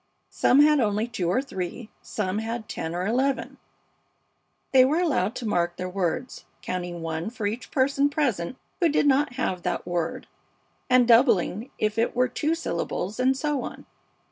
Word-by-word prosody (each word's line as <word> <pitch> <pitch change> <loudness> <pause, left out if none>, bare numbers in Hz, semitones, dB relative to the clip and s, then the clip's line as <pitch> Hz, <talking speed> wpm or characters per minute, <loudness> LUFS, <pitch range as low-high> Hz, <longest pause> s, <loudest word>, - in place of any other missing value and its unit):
Some 275 - +4
had 300 0 +5
only 215 -1 +1
two 195 -7 -2
or 230 +9 +1
three, 200 -1 -6
some 205 -1 -2
had 225 0 -4
ten 160 +1 -4
or 180 +1 -2
eleven. 260 +5 0 1.1
They 260 -1 +7
were 280 +5 +2
allowed 255 - +1
to 245 - -5
mark 175 -4 0
their 180 0 -4
words, 190 +6 -3 0.2
counting 175 -2 -4
one 165 +4 -3
for 230 -2 -5
each 225 +3 -3
person 275 +2 +2
present 260 - -1 0.2
who 340 -4 +3
did 295 - +2
not 285 0 +3
have 190 -8 -2
that - - -2
word 170 -2 -2 0.6
and 250 -1 +5
doubling 230 -2 +3
if 215 +1 0
it 230 - +1
were 250 +1 +3
two 305 +6 -1
syllables, 195 - -3
and 260 +1 +3
so 295 -2 -1
on. - - -8
230 Hz, 170 wpm, -25 LUFS, 185-265 Hz, 1.1 s, They